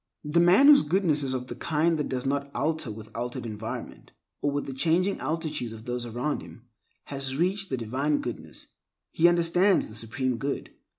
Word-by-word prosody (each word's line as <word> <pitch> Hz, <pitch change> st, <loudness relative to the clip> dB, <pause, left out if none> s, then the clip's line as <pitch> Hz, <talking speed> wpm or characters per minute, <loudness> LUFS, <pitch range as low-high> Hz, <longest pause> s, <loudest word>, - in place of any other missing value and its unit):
The 150 Hz, +3 st, +1 dB
man 180 Hz, +10 st, +6 dB
whose 290 Hz, 0 st, +9 dB
goodness 155 Hz, -1 st, +2 dB
is 130 Hz, -2 st, 0 dB
of 125 Hz, -1 st, -3 dB
the -, -, -6 dB
kind 160 Hz, +1 st, 0 dB
that 150 Hz, -, -2 dB
does 130 Hz, -1 st, -3 dB
not 140 Hz, +1 st, -1 dB
alter 155 Hz, +1 st, 0 dB
with 110 Hz, 0 st, -9 dB
altered 120 Hz, +1 st, -4 dB
environment, 110 Hz, 0 st, -7 dB, 0.3 s
or 145 Hz, -, +1 dB
with 145 Hz, 0 st, -2 dB
the 135 Hz, -, -5 dB
changing 170 Hz, +8 st, +1 dB
attitudes 150 Hz, -4 st, -3 dB
of 110 Hz, 0 st, -11 dB
those 120 Hz, 0 st, -3 dB
around 125 Hz, +6 st, -2 dB
him, 120 Hz, -, -13 dB, 0.4 s
has 135 Hz, -1 st, -4 dB
reached 190 Hz, +4 st, 0 dB
the 130 Hz, -, -1 dB
Divine 135 Hz, +6 st, 0 dB
Goodness; 120 Hz, -, -7 dB, 0.5 s
he 170 Hz, -, +4 dB
understands 175 Hz, +3 st, +3 dB
the -, -, -11 dB
Supreme 120 Hz, +3 st, -2 dB
Good. 140 Hz, +2 st, -3 dB
140 Hz, 185 wpm, -27 LUFS, 125-165 Hz, 0.5 s, whose